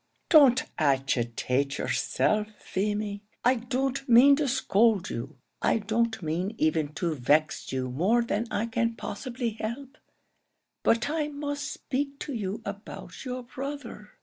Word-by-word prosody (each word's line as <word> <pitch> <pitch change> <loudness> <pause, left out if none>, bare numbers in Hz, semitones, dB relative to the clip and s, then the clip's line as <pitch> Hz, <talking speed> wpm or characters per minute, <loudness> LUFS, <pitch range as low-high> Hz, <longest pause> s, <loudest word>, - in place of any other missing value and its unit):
"Don't 270 -6 +7 0.2
agitate 135 -1 +1
yourself, 215 0 +1
Feemy. 205 +1 -2 0.2
I 250 - +6
don't 265 +3 -2
mean 255 +4 +8
to 295 -2 0
scold 225 -6 +2
you; 130 +4 -6 0.2
I - - +3
don't 220 -1 0
mean 175 +7 -2
even 155 -1 +1
to 170 -1 -1
vex 150 +3 +1
you 130 -1 -1
more 200 - +2
than 230 0 -1
I 215 - -1
can 230 0 0
possibly 240 +2 -4
help; 265 +6 -5 0.8
but 230 0 +2
I 310 -2 0
must 290 -1 -4
speak 275 +1 -3
to 290 - -4
you 210 -1 -3
about 200 +1 -8
your 250 0 -4
brother. 255 -4 -7
225 Hz, 135 wpm, -28 LUFS, 175-260 Hz, 0.8 s, mean